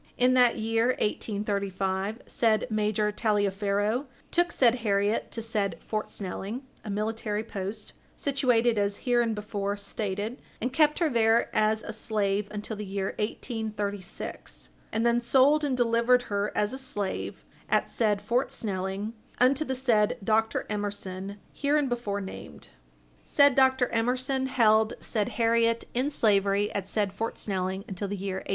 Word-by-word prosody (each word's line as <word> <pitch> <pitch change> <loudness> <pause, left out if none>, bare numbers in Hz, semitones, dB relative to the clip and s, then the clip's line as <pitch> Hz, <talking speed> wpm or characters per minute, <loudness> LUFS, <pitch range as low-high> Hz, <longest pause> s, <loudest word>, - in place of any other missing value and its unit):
In 250 +1 +4
that 250 -2 +5
year, 225 +1 +1
1835, 200 0 -2
said 220 -2 +2
Major 210 0 +1
Taliaferro 205 +3 0 0.2
took 345 0 +2
said 245 -4 +3
Harriet 205 0 +1
to 225 - -5
said 210 -3 -1
Fort 215 -1 -3
Snelling, 205 +5 -5 0.2
a 215 - -7
military 215 +1 -2
post, 200 -1 -6 0.2
situated 245 -5 +2
as 200 0 -1
hereinbefore 210 -4 0
stated, 205 +3 -3 0.2
and 250 +3 -2
kept 300 +1 +4
her 335 - +2
there 230 -3 +2
as 215 0 +2
a 230 - -5
slave 210 -2 0
until 210 +1 -5
the 210 - -5
year 195 -1 -3
1836, 210 -3 -4 0.2
and 225 +1 0
then 235 0 +3
sold 275 +5 +4
and 270 -3 0
delivered 240 +1 +3
her 205 -2 -1
as 210 +3 +1
a 265 - -2
slave, 205 -7 -3 0.2
at - - +2
said 210 -3 +1
Fort 245 +3 0
Snelling, 195 +1 -2 0.2
unto 265 +4 +4
the 265 -3 -2
said 230 -5 +2
Dr. 220 +2 +1
Emerson 200 -2 -4 0.2
hereinbefore 245 -8 0
named. 190 - -9 0.5
Said 285 -1 +5
Dr. 260 -1 +4
Emerson 255 +3 0
held 220 -4 +3
said 210 -3 -1
Harriet 230 0 +3
in 255 +4 +1
slavery 205 -5 +2
at 195 -2 -3
said 200 -1 0
Fort 225 +3 -3
Snelling 190 -1 -2
until 195 +1 -4
the 200 +1 -4
year 190 0 -3
1838. - - -8
215 Hz, 145 wpm, -28 LUFS, 200-240 Hz, 0.5 s, that